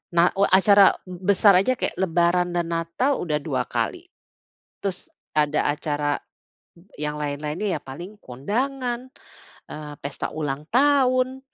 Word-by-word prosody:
nah 170 +1 +5
u 200 - +5
acara 195 +1 +6
be 185 +2 -1
besar 195 0 +6
aja 255 +7 +1
kayak - - -3
lebaran 175 0 +1
dan 170 -1 0
natal 170 +12 0
udah 150 -3 -1
2 - - -1
kali. 360 -2 -2 0.8
Terus 195 -2 -4 0.2
ada 150 -1 +2
acara, 145 -1 -1 0.8
yang 150 0 -2
lain-lainnya, 150 +5 -2
ya, - - -35
paling 175 +10 -9
kondangan, 245 - -3 0.6
eee, 150 -1 -7
pesta 140 0 -4
ulang 150 -1 -4
tahun. 260 -1 +3
180 Hz, 130 wpm, -24 LUFS, 150-235 Hz, 0.8 s, acara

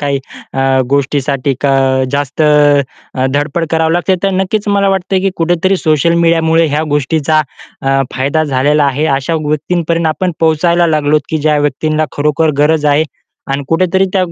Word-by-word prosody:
काही 140 -1 -1 0.3
अ, 135 - -2 0.3
गोष्टीसाठी 140 -1 0
का 140 -1 +1 0.4
जास्त 145 +2 -1
अ, 145 -3 +1
धडपड 145 +4 -1
करावी 160 0 +1
लागते. 175 +2 +1
तर 195 - +1
नक्कीच 205 +2 -2
मला 200 -1 +2
वाटतं 195 0 -1
आहे, 185 - +2
की 195 - +1
कुठेतरी 175 +3 +1
सोशल 160 0 +1
मीडियामुळे 165 -1 +2
ह्या 150 +2 -1
गोष्टीचा 155 +2 +1 0.4
अ, 135 0 +1
फायदा 140 +4 0
झालेला 145 +1 +1
आहे. 140 +3 0
अशा 150 +5 -3
व्यक्तींपर्यंत 165 +2 -1
आपण 180 +3 -1
पोहोचायला 170 +2 +2
लागलो, 155 -1 +2
की 160 - -1
ज्या 150 0 +1
व्यक्तींना 155 +2 0
खरोखर 150 +2 +1
गरज 150 +1 +2
आहे 155 +2 +2 0.5
आणि 140 +1 -2
कुठेतरी 185 +3 +2
त्या 190 - +1
155 Hz, 160 wpm, -13 LUFS, 145-170 Hz, 0.5 s, मला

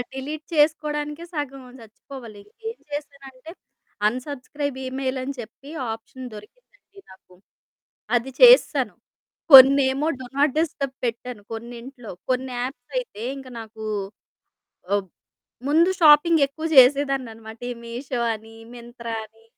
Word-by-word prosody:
Delete 295 +3 -6
చేసుకోడానికే 300 +1 0
సగం 275 -3 -4 0.2
చచ్చిపోవాలి, 225 -1 -12 0.3
ఏం 460 - -8
చేశానంటే 280 -1 -8 0.6
అన్సబ్స్క్రైబ్ 280 +3 -4
ఈమెయిల్ 260 0 -3
అని 275 +2 -4
చెప్పి 235 +5 -11 0.2
ఆప్షన్ 225 +3 -9
దొరికిందండి 405 - -16
నాకు, 185 -1 -19 0.8
అది 240 +3 -1
చేసెశాను. - - +6 0.6
కొన్నేమో 270 +2 +8
డు 260 - -7
నాట్ 285 -1 +3
డిస్టర్బ్ 280 -4 -2
పెట్టాను 235 -1 -4
కొన్నింట్లో. 235 +1 -8 0.2
కొన్ని 255 0 -1
యాప్స్ 250 -1 -7
అయితే 485 - -5 0.2
ఇంక 265 -1 -10
నాకు 220 0 -11 1.1
ఆహ్, 205 -1 +1 0.6
ముందు 330 +5 +4
షాపింగ్ 315 +1 +6
ఎక్కువ 315 +4 -6
చేసేదాన్నన్నమాట. 255 -5 +3
ఈ - - -8
మీషో 245 +2 -5
అని, 220 +1 -12 0.2
మింత్రా 235 -1 -8
అని 225 +1 -21
265 Hz, 110 wpm, -23 LUFS, 235-290 Hz, 1.1 s, కొన్నేమో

